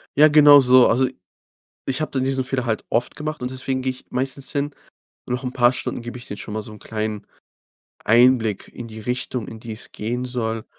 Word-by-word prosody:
Ja, 150 +2 +7
genau 145 -1 +8
so. 125 0 +6
Also, 130 +3 +3 0.8
ich 135 +1 -1
habe 155 - -2
dann 130 -1 -1
diesen 135 0 0
Fehler 130 -1 -2
halt 110 -3 -2
oft 120 - 0
gemacht 155 -1 -5
und 125 - -3
deswegen 130 0 -3
gehe 130 - -1
ich 130 - -14
meistens 135 +2 -3
hin. 145 0 -2 0.5
Noch 125 +2 -2
'n 125 0 -4
paar 120 -1 +4
Stunden 125 - -4
gebe 120 +1 -7
ich 120 - -12
denen 105 - -6
schon 105 - -7
mal 110 - -3
so 110 - -11
'n 105 - -12
kleinen 110 -1 -4 0.8
Einblick 115 -2 +3
in 120 - -9
die 110 0 -9
Richtung, 125 0 -3
in 110 - -9
die 115 -1 -7
es 110 - -8
gehen 120 +4 -3
soll. 115 -3 -3
125 Hz, 215 wpm, -22 LUFS, 115-130 Hz, 0.8 s, genau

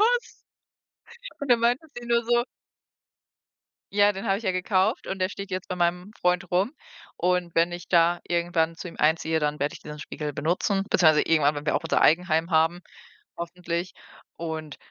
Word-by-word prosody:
was?“ 480 +3 +1 1.0
Und 280 -3 0
dann 235 - +5
meinte 245 +7 +1
sie 240 - -7
nur 235 0 +2
so: 240 +1 +2 1.5
Ja, 205 0 +4
den 195 +3 -6
habe 195 - +2
ich 220 - -8
ja 190 - +1
gekauft 185 +3 +1
und 190 - -4
der 185 +1 0
steht 200 0 -7
jetzt 185 0 -4
bei - - -2
meinem 180 +3 0
Freund 180 +1 +1
rum 190 - +1 0.4
und 180 -1 0
wenn 170 +1 +3
ich 175 0 -8
da 170 0 +3
irgendwann 170 -1 0
zu 185 - -7
ihm 170 - -9
einziehe, 160 +1 +2
dann 150 0 -1
werde 145 0 -1
ich - - -9
diesen 150 0 -9
Spiegel 150 0 -5
benutzen 180 +6 0
beziehungsweise 155 -4 +5
irgendwann, 150 -2 +3
wenn 145 - -6
wir 150 - 0
auch - - 0
unser - - +1
Eigenheim 165 0 +3
haben, 165 +2 +2 0.6
hoffentlich. 170 0 -4 0.5
Und 160 -3 -5
175 Hz, 180 wpm, -26 LUFS, 160-195 Hz, 1.5 s, dann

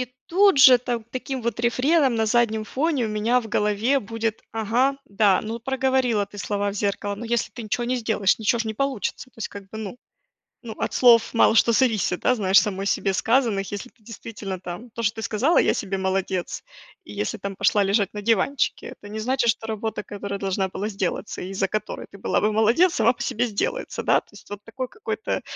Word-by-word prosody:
И 250 - -2 0.2
тут 390 -3 +4
же 260 -2 +9
там 240 -2 -3
таким 260 -1 -4
вот 235 -1 -2
рефреном 260 +3 +2
на 220 -1 +1
заднем 220 -1 +1
фоне 275 +1 0
у - - -4
меня 215 +4 +1
в 225 - -9
голове 210 +7 +2
будет: 225 0 -3
"Ага, 235 +5 +1
да, 200 -2 +3
ну, 225 +2 -5
проговорила 260 -3 +1
ты 205 - -13
слова 200 +2 -1
в - - -8
зеркало, 205 0 -2
но 235 - -7
если 235 0 -1
ты 240 - -7
ничего 230 +3 -2
не 250 +1 0
сделаешь, 220 -4 +1
ничего 225 +2 +1
ж 230 - -1
не 220 - -3
получится". 275 -2 -2
То - - -25
есть 220 - -3
как 200 - -9
бы 220 - -7
ну 220 +2 -6 0.7
ну, 220 - -5
от - - -2
слов 235 -2 +5
мало 225 0 +4
что 230 +1 +4
зависит, 220 -7 +1
да, 255 - +3
знаешь, 195 -3 +3
самой 195 -2 -3
себе 195 0 +1
сказанных. 225 -3 +1
Если 245 +5 -6
ты 230 - -34
действительно 205 -4 -7
там 180 +8 -8
то, 230 +1 -5
что 210 +1 +1
ты 220 - -6
сказала: 245 +11 +1
"Я - - +3
себе 195 -1 -3
молодец". 190 -1 -2 0.4
И - - -12
если 205 +2 -3
там 200 -1 -6
пошла 205 -1 +3
лежать 200 0 +1
на 210 - -5
диванчике, 230 +5 0
это 205 - -13
не 220 - -5
значит, 245 +1 +1
что 225 0 0
работа, 220 -1 -3
которая 200 -1 -6
должна 190 0 -1
была 195 +3 -4
сделаться 195 0 -3
и 180 - -6
из-за 195 0 -1
которой 215 +1 -4
ты 200 - -13
была - - 0
бы 210 0 +1
молодец, 235 +12 +4
сама - - +4
по 240 - -10
себе 240 0 0
сделается. 220 - -3
Да, - - +3
то - - -33
есть - - -16
вот 205 0 -8
такой 250 +4 -5
какой-то 435 - -4
220 Hz, 220 wpm, -23 LUFS, 205-245 Hz, 0.7 s, же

